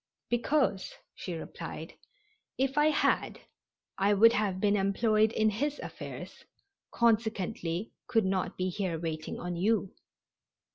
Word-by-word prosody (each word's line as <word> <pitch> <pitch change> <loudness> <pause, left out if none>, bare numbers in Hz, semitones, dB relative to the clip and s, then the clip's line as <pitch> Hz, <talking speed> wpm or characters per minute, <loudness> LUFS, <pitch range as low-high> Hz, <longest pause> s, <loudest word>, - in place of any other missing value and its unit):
"Because," 240 -5 +1 0.2
she 180 - -6
replied, 160 - -7 0.6
"if 270 +1 0
I 295 +1 +4
had 310 - +1 0.6
I 200 +1 +4
would 230 +3 +7
have 205 -5 0
been 205 +1 +3
employed 215 +2 +2
in 220 -1 +2
his 285 +8 -1
affairs, - - -8 0.5
consequently 215 -5 0 0.2
could 225 -3 +2
not 190 -1 -1
be 185 0 0
here 185 -3 -2
waiting 155 -1 -4
on 175 0 -4
you." 200 +2 +1
205 Hz, 125 wpm, -30 LUFS, 185-230 Hz, 0.6 s, would